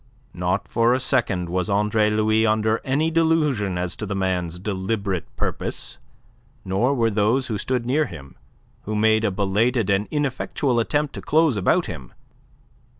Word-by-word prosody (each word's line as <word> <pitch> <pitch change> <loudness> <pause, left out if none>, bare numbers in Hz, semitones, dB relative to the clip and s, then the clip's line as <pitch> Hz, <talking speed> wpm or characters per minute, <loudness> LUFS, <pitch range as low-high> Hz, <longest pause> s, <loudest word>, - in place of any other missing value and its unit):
Not 90 +3 -1
for 115 +1 +2
a - - 0
second 120 -9 0
was 90 +3 -1
Andre 105 +1 +2
Louis 110 +1 +2
under 110 0 +1
any 150 +5 0
delusion 150 - +1
as 90 0 -2
to 105 - -5
the 100 - -3
man's 90 -3 -1
deliberate 95 -1 -2
purpose, - - -4 0.7
nor 105 +9 +1
were 115 -3 +1
those 110 +6 +1
who 105 -3 -2
stood 125 -2 -1
near 145 +4 +1
him, 70 - -11 0.5
who 110 - -3
made 110 +1 +3
a 110 - +2
belated 105 +3 +1
and 100 +2 +1
ineffectual 135 -3 -1
attempt 145 +5 0
to - - -7
close 155 -3 +2
about 95 -3 +2
him. - - -8
110 Hz, 155 wpm, -23 LUFS, 95-130 Hz, 0.7 s, made